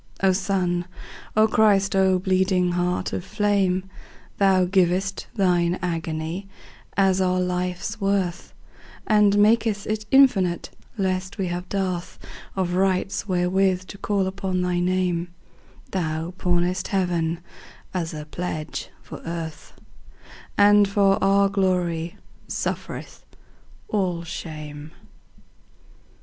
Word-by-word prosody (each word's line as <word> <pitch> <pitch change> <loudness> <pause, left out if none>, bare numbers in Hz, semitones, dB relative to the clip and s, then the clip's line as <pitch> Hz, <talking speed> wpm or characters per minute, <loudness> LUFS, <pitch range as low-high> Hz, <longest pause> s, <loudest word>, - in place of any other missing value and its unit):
O 190 - +6
Sun, 180 -3 0 0.5
O 215 0 +6
Christ, 205 -3 +3
O 190 -1 +4
bleeding 185 -1 +2
Heart 180 +1 -1
of - - -3
flame! 195 -2 +1 0.5
Thou 190 -2 +4
giv'st 190 +1 +1
Thine 180 -3 +2
agony 165 +2 -3 0.5
as 190 -1 +3
our 185 0 +2
life's 180 +4 -2
worth, 195 -3 -1 0.5
And 210 -2 +4
mak'st 215 -1 +3
it 215 0 -3
infinite, 200 -11 +4 0.3
lest 185 0 -1
we 190 -3 -1
have 175 +1 -4
dearthOf 185 -3 -2 0.4
rights 185 +2 0
wherewith 185 0 +1
to - - -8
call 200 -2 0
upon 190 -1 -2
thy 180 -1 0
Name; 180 -1 0 0.6
Thou 165 -1 -2
pawnest 180 0 0
Heaven 170 -4 0 0.5
as 170 -3 -2
a 150 -1 -6
pledge 155 -1 -5
for - - -9
Earth, 165 -2 -6 0.8
And 205 0 +6
for 195 -1 +2
our 200 0 +4
glory 180 -4 0 0.3
sufferest - - -4 0.6
all 180 -5 -1
shame. 155 -3 -7
185 Hz, 110 wpm, -24 LUFS, 175-195 Hz, 0.8 s, O